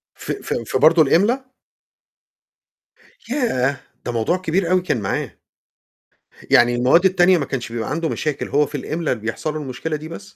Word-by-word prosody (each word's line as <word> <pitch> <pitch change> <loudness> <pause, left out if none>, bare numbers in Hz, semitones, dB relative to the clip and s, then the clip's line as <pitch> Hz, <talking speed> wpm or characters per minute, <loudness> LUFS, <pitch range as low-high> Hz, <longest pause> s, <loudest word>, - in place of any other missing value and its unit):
ف - - -6
ف - - -4
في 115 +3 -2
برضو 160 +4 +5
الإملا؟ 240 - +2 1.8
ياه! 140 - 0 0.3
ده 120 - -2
موضوع 120 +10 0
كبير 180 0 -1
أوي 185 -1 +3
كان 145 -10 -1
معاه. 95 - -2 1.2
يعني 120 0 +5
المواد 130 +9 +4
التانية 185 -1 +4
ما 140 - -1
كانش 120 -4 -5
بيبقى 115 -2 -3
عنده 165 +1 -1
مشاكل، 150 -3 -3
هو 145 +1 +2
في - - -15
الإملا 155 +4 -2
بيحصَل 115 +7 -4
له 155 - -4
المشكلة 145 +3 -4
دي 155 +1 -9
بس؟ 100 - -8
155 Hz, 160 wpm, -20 LUFS, 125-175 Hz, 1.8 s, برضو